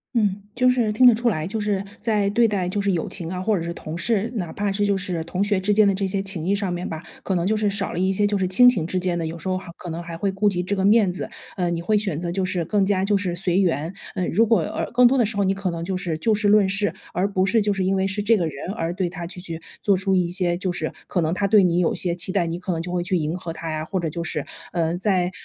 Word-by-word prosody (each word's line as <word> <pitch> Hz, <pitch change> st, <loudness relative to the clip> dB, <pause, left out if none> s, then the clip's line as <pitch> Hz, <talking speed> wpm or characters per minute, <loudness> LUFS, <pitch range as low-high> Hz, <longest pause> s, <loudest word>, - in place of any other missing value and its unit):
嗯， 205 Hz, -3 st, +1 dB
就 255 Hz, 0 st, +4 dB
是 240 Hz, -4 st, +2 dB
听 250 Hz, +4 st, +6 dB
得 240 Hz, -, +7 dB
出 235 Hz, +1 st, +1 dB
来， 155 Hz, -4 st, -2 dB
就 220 Hz, +3 st, -3 dB
是 205 Hz, -2 st, 0 dB, 0.2 s
在 210 Hz, -3 st, +1 dB
对 235 Hz, +2 st, +4 dB
待 195 Hz, -5 st, 0 dB
就 200 Hz, +2 st, -1 dB
是 200 Hz, -, +1 dB
友 170 Hz, -3 st, -1 dB
情 170 Hz, -4 st, -5 dB
啊， 185 Hz, -, -3 dB
或 210 Hz, +2 st, +1 dB
者 170 Hz, -, -2 dB
是 170 Hz, 0 st, -4 dB
同 160 Hz, 0 st, -7 dB
事， 215 Hz, +4 st, 0 dB
哪 175 Hz, -6 st, -3 dB
怕 205 Hz, 0 st, -2 dB
是 205 Hz, +1 st, 0 dB
就 200 Hz, -1 st, +2 dB
是 180 Hz, -4 st, -3 dB
同 180 Hz, +3 st, -3 dB
学 205 Hz, -1 st, +2 dB
之 200 Hz, +2 st, +1 dB
间 210 Hz, -1 st, +5 dB
的 195 Hz, -, +3 dB
这 195 Hz, 0 st, -1 dB
些 195 Hz, +1 st, -1 dB
情 190 Hz, -4 st, -2 dB
谊 195 Hz, -, +2 dB
上 200 Hz, -2 st, -1 dB
面 175 Hz, +1 st, -4 dB
吧， 160 Hz, -1 st, -5 dB, 0.2 s
可 195 Hz, -, -1 dB
能 175 Hz, +1 st, 0 dB
就 215 Hz, -, +2 dB
是 210 Hz, -1 st, +1 dB
少 200 Hz, -1 st, -3 dB
了 175 Hz, -, -3 dB
一 190 Hz, +1 st, +2 dB
些 205 Hz, +2 st, +2 dB
就 205 Hz, 0 st, 0 dB
是 190 Hz, -, 0 dB
亲 245 Hz, +7 st, +7 dB
情 175 Hz, -10 st, 0 dB
之 185 Hz, +2 st, -1 dB
间 180 Hz, -1 st, -1 dB
的， 165 Hz, -, -2 dB
有 165 Hz, +1 st, -5 dB
时 190 Hz, -, -7 dB
候 185 Hz, 0 st, 0 dB
还 185 Hz, -2 st, -9 dB
可 175 Hz, -, -8 dB
能 165 Hz, +1 st, -5 dB
还 170 Hz, -1 st, -7 dB
会 200 Hz, +2 st, 0 dB
顾 200 Hz, +2 st, +2 dB
及 180 Hz, -2 st, -1 dB
这 195 Hz, +3 st, -1 dB
个 190 Hz, -, -1 dB
面 205 Hz, -1 st, +5 dB
子。 180 Hz, -, -4 dB, 0.3 s
呃， 180 Hz, -3 st, 0 dB
你 170 Hz, -1 st, -2 dB
会 210 Hz, +4 st, +2 dB
选 190 Hz, -7 st, -2 dB
择 175 Hz, 0 st, -3 dB
就 190 Hz, +2 st, -1 dB
是 180 Hz, -2 st, -1 dB
更 200 Hz, +2 st, +2 dB
加 195 Hz, -1 st, +1 dB
就 205 Hz, -, +2 dB
是 185 Hz, -3 st, -1 dB
随 180 Hz, +1 st, +1 dB
缘， 165 Hz, -1 st, 0 dB, 0.2 s
嗯， 185 Hz, -2 st, -1 dB
如 225 Hz, +6 st, +4 dB
果， 225 Hz, -4 st, +3 dB
呃， 160 Hz, -, -3 dB
更 245 Hz, +1 st, +6 dB
多 265 Hz, +2 st, +2 dB
的 240 Hz, -, +4 dB
时 210 Hz, 0 st, -4 dB
候 200 Hz, -, +2 dB
你 190 Hz, -, +2 dB
可 195 Hz, -2 st, -2 dB
能 165 Hz, 0 st, -5 dB
就 190 Hz, 0 st, -2 dB
是 175 Hz, -4 st, -2 dB
就 220 Hz, +7 st, +1 dB
事 205 Hz, -1 st, +1 dB
论 205 Hz, -2 st, +5 dB
事， 195 Hz, +2 st, 0 dB, 0.2 s
而 180 Hz, +3 st, +1 dB
不 185 Hz, 0 st, +2 dB
是 225 Hz, +2 st, +3 dB
就 205 Hz, 0 st, +1 dB
是 190 Hz, -2 st, -1 dB
因 195 Hz, +1 st, +2 dB
为 190 Hz, 0 st, +1 dB
是 195 Hz, +2 st, -1 dB
这 225 Hz, +2 st, +4 dB
个 175 Hz, -5 st, 0 dB
人 145 Hz, +4 st, -6 dB
而 170 Hz, -5 st, -2 dB
对 185 Hz, -1 st, -1 dB
他 170 Hz, 0 st, -6 dB
就 180 Hz, +1 st, -8 dB
去 165 Hz, -3 st, -6 dB, 0.2 s
做 200 Hz, -2 st, +3 dB
出 195 Hz, +1 st, 0 dB
一 180 Hz, -2 st, +2 dB
些， 175 Hz, -1 st, 0 dB
就 185 Hz, -1 st, -2 dB
是， 155 Hz, -2 st, -3 dB, 0.2 s
可 175 Hz, -, 0 dB
能 160 Hz, +1 st, 0 dB
他 200 Hz, +1 st, 0 dB
对 205 Hz, -1 st, +6 dB
你 175 Hz, -1 st, +2 dB
有 175 Hz, -, +1 dB
些 175 Hz, -2 st, -1 dB
期 180 Hz, +2 st, -1 dB
待， 180 Hz, -4 st, +2 dB
你 170 Hz, +1 st, -3 dB
可 185 Hz, -1 st, -3 dB
能 165 Hz, -, -2 dB
就 175 Hz, -, -5 dB
会 180 Hz, -1 st, 0 dB
去 185 Hz, +2 st, -1 dB
迎 160 Hz, +1 st, -1 dB
合 170 Hz, -3 st, -6 dB
他 165 Hz, 0 st, -6 dB
呀。 155 Hz, 0 st, -2 dB
或 190 Hz, -, -3 dB
者 165 Hz, -2 st, -2 dB
就 170 Hz, +2 st, -4 dB
是， 150 Hz, -3 st, -3 dB, 0.3 s
嗯， 170 Hz, 0 st, 0 dB
在， 185 Hz, -3 st, +1 dB
190 Hz, 345 characters per minute, -23 LUFS, 175-205 Hz, 0.3 s, 得